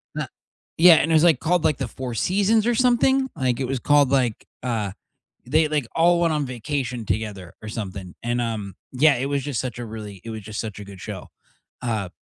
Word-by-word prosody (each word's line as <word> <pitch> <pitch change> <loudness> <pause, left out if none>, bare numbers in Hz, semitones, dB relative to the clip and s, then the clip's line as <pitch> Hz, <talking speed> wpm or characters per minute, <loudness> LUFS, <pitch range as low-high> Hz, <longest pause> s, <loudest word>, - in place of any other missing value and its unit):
Na - - -2 0.5
yeah, 170 0 +9
and 160 +1 +2
it - - +3
was, 155 0 +5
like, 165 -7 +5
called, 175 0 +1
like, 150 - +2
the 135 - -3
Four 125 0 -6
Seasons 205 - +2
or 240 - +2
something, 260 +2 +3
like, 125 -2 0
it 130 - -1
was 135 +1 -1
called, 145 +1 +4
like, 125 -5 +1 0.2
uh 110 -5 -1 0.5
they, 155 +5 +3
like, 145 -6 -1
all 170 +1 +4
went 165 -2 +2
on 150 -2 0
vacation 125 0 -3
together 100 -5 -3
or 110 - -6
something, 95 -5 -6
and, 120 +1 0
um, 105 -5 -4 0.2
yeah, 140 +3 +4
it 125 - -2
was 140 0 -1
just 140 -4 -2
such 125 -2 -5
a 120 - -4
really 105 -4 -8
it 115 - -8
was 110 -1 -6
just 105 +2 -7
such 105 -3 -5
a 105 - -7
good 100 -1 -11
show. - - -7 0.5
Uh, 110 -6 -2
125 Hz, 220 wpm, -23 LUFS, 110-155 Hz, 0.5 s, yeah